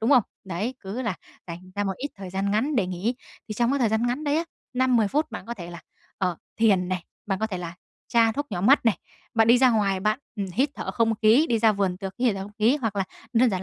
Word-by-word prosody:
đúng 225 +5 +1
không? 250 -5 +7 0.2
Đấy, 195 +8 -3
cứ 205 +7 -5
là 220 -6 -1 0.3
dành 180 +2 -9
ra 205 0 -1
một 195 - 0
ít 285 +3 -4
thời 190 -2 -8
gian 195 +1 -1
ngắn 255 +8 +1
để 195 -5 +2
nghỉ, 185 +7 -2 0.3
thì 215 - -4
trong 240 +3 +2
cái 280 - +1
thời 235 -4 +3
gian 220 +2 +1
ngắn 255 +6 -2
đấy 290 +1 +1
á, 330 - 0 0.3
5-10 250 -5 +3
phút 300 +1 0
bạn 225 - -7
có 235 - -4
thể 175 -4 -8
là, 170 - -9 0.4
ờ, 180 -4 0 0.2
thiền 190 -5 +4
này, 185 -2 -2 0.2
bạn 195 -2 -1
có 220 - 0
thể 190 -4 -4
là 170 0 -6 0.3
tra 230 -1 +4
thuốc 285 +4 -3
nhỏ 175 - -2
mắt 255 +6 +5
này, 200 -7 +3 0.4
bạn 225 0 +4
đi 240 +1 +7
ra 255 -1 +6
ngoài 200 -4 +1
bạn, 215 +5 +1 0.2
ừm, 200 -1 -2
hít 270 +5 +2
thở - - -4
không 225 -1 +1
khí, 240 +9 +6
đi 230 - +2
ra 220 -1 +4
vườn 195 -3 0
tược 195 0 -6
hít 240 -5 +2
thở 190 - -4
không 205 +1 -9
khí 235 +7 +4
hoặc 225 -7 -3
là 195 - +1 0.3
đơn 245 +1 +4
giản 190 -2 -2
220 Hz, 275 wpm, -25 LUFS, 190-245 Hz, 0.4 s, không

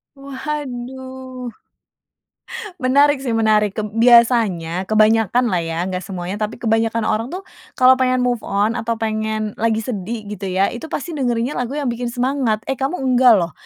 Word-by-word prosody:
Waduh, 260 -2 -6 1.4
menarik 285 +3 +4
sih, 240 - -1
menarik. 215 -2 +2
Keb 215 0 -3 0.2
biasanya 220 -8 +4
kebanyakan 220 +3 +3
lah 185 - 0
ya, 165 0 -4
nggak 185 0 -4
semuanya, 185 +1 -5
tapi 220 +3 -7
kebanyakan 225 0 +1
orang 225 +5 -1
tuh 365 - -4 0.3
kalau 260 0 +5
pengen 255 -1 +1
move 245 -2 0
on 210 +4 0
atau 230 0 -3
pengen 215 -1 -2
lagi 225 0 +1
sedih 215 -1 -5
gitu 205 -1 -6
ya, 190 +1 +1
itu 305 +6 -8
pasti 320 +3 -4
dengerinnya 245 0 -1
lagu 250 +1 -2
yang 290 -2 -2
bikin 240 0 -3
semangat. 250 -3 0
Eh, 270 - -1
kamu 275 +6 -2 0.2
nggak 250 -1 +7
loh, 170 -1 -3
230 Hz, 160 wpm, -19 LUFS, 215-255 Hz, 1.4 s, nggak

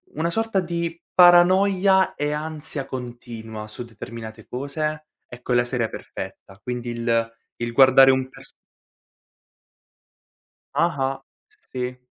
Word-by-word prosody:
una 160 +3 0
sorta 225 +1 0
di 170 -1 -3
paranoia 185 +2 +5
e 145 0 -1
ansia 150 -2 -4
continua, 115 -3 -7
su 110 +3 -7
determinate 110 -1 -9
cose, 150 +4 -3 0.2
ecco 125 0 -5
è - - +3
la 120 0 +3
serie 120 -2 -1
perfetta". 95 0 -9
Quindi 125 -1 -4
il 115 -1 0 0.3
il 120 0 -2
guardare 135 +1 +7
un 130 0 +2
pers 130 - -8 2.2
Ah-ah. 135 -5 0 0.3
Sì. 130 - -6
135 Hz, 115 wpm, -23 LUFS, 120-170 Hz, 2.2 s, guardare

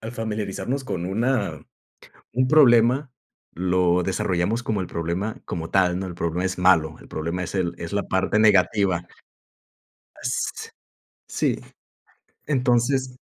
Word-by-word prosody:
al 110 +2 -7
familiarizarnos 115 +4 -3
con 90 -7 -3
una 100 - -1 0.7
un 130 +2 +2
problema, 130 -1 +5 0.4
lo 90 0 +2
desarrollamos 95 +4 -1
como 105 -3 -1
el 90 - -4
problema 85 +6 -3
como 80 -1 -5
tal, 90 -1 +2
¿no? 95 - -3
El 90 - -7
problema 85 +2 -2
es 95 - -2
malo, 85 -4 +3
el - - -15
problema 85 +4 -3
es - - -6
el 85 -2 -1
es 85 +3 -6
la 100 - 0
parte 95 +3 0
negativa. 100 -3 +3 1.1
Ah, - - -18
si. - - -2 0.7
Sí. - - -1 0.9
Entonces 130 -1 +1
95 Hz, 135 wpm, -23 LUFS, 90-120 Hz, 1.1 s, problema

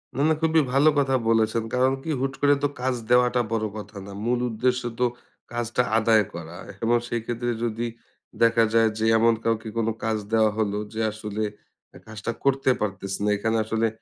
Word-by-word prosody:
না, 135 - -1
না - - +4
খুবই 160 0 +4
ভালো 140 +3 +5
কথা 135 -1 +2
বলেছেন। 110 0 +2
কারণ 130 +1 +3
কী? - - -6
হুট 135 0 -1
করে 145 0 +5
তো - - +4
কাজ 130 0 0
দেওয়াটা 125 0 +4
বড় 110 -1 0
কথা 105 0 -9
না। 100 - -9
মূল 120 +1 +1
উদ্দেশ্য 125 +3 0 0.2
তো 125 - +3 0.5
কাজটা 120 +1 0
আদায় 110 -1 +4
করা 85 0 -8 0.3
এবং 120 +1 +3
সেই 120 -1 -2
ক্ষেত্রে 120 +1 -2
যদি 115 +1 -1 0.6
দেখা 115 0 +5
যায় 115 -1 +5
যে 110 - 0
এমন 115 +1 +4
কাউকে 115 -1 -1
কোন 115 -1 +1 0.2
কাজ 110 -1 0 0.2
দেওয়া 110 -1 +4
হলো 105 -2 0 0.2
যে 110 - -2
আসলে 105 0 -4 0.6
কাজটা 110 +1 -4
করতে 135 -1 +2
পারতেছে 100 -1 -3
না। - - +2
এখানে 110 +2 0
আসলে 110 +1 +1
115 Hz, 185 wpm, -25 LUFS, 110-125 Hz, 0.6 s, ভালো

